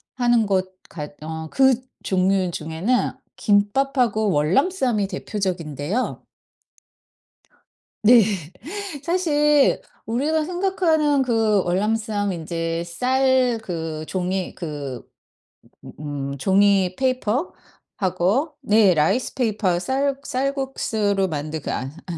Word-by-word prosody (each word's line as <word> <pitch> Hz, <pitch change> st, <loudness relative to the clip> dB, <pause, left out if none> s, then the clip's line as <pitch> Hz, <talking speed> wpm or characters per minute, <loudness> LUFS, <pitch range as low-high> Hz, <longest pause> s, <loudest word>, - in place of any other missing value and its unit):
하는 240 Hz, -3 st, +3 dB
것 190 Hz, -1 st, 0 dB, 0.2 s
같 150 Hz, -2 st, -7 dB
어 160 Hz, 0 st, -6 dB
그 265 Hz, -2 st, +4 dB, 0.2 s
종류 185 Hz, -1 st, +1 dB
중에는 165 Hz, +11 st, -1 dB, 0.3 s
김밥하고 220 Hz, +1 st, +2 dB
월남쌈이 215 Hz, -, +1 dB
대표적인데요. 185 Hz, -, -3 dB, 1.8 s
네. 230 Hz, +2 st, +7 dB, 0.8 s
사실 295 Hz, -5 st, +3 dB, 0.2 s
우리가 295 Hz, +7 st, 0 dB
생각하는 335 Hz, -6 st, +1 dB
그 225 Hz, -5 st, +2 dB
월남쌈 205 Hz, +2 st, 0 dB
인제 165 Hz, 0 st, -3 dB
쌀 255 Hz, +5 st, +2 dB
그 160 Hz, -4 st, -4 dB
종이 185 Hz, 0 st, -2 dB
그 145 Hz, -6 st, -6 dB, 0.8 s
음 -, -, -10 dB
음 145 Hz, -2 st, -4 dB
음 140 Hz, -, -6 dB
종이 190 Hz, +2 st, +3 dB
페이퍼하고 255 Hz, -, -1 dB
네 210 Hz, -5 st, +4 dB
라이스페이퍼 200 Hz, -, +1 dB
쌀 270 Hz, +5 st, 0 dB
쌀국수로 255 Hz, -8 st, -1 dB
만든 155 Hz, 0 st, -4 dB
그 -, -, -6 dB
아 130 Hz, +2 st, -3 dB, 0.2 s
아 170 Hz, -2 st, -4 dB
205 Hz, 200 characters per minute, -22 LUFS, 175-260 Hz, 1.8 s, 네